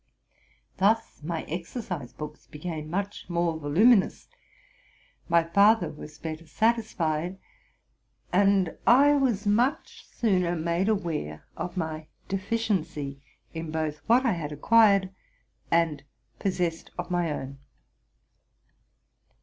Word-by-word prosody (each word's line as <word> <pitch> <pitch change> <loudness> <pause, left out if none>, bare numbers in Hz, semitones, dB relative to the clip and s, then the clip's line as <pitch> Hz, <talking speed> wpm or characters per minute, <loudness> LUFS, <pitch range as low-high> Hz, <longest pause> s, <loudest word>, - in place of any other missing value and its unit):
Thus 210 0 +1
my 160 +1 -3
exercise 175 - -5
books 150 0 -9
became 155 0 -6
much 200 +2 -4
more 170 -2 0
voluminous, 190 +9 +3 1.0
my 170 0 +4
father 200 +7 +4
was 150 0 -11
better 160 +1 -6
satis 225 +4 +1
fied, 165 +2 -1 1.0
and 195 -2 +3
I 280 +4 +7
was 250 -8 +1
much 240 +9 0
sooner 180 -6 +1
made 170 +4 0
aware 160 - -2
of 180 +1 -5
my 160 -2 -3 0.2
deficiency 190 -9 -2 0.3
in 160 0 -5
both 155 -1 -2
what 245 +4 +4
I 235 - +3
had 160 -4 -3
acquired 200 +4 +4 0.6
and 165 -3 +2 0.4
possessed 175 -4 -1
of - - -5
my 175 -2 +1
own. 135 -1 -6
175 Hz, 110 wpm, -27 LUFS, 155-205 Hz, 1.0 s, I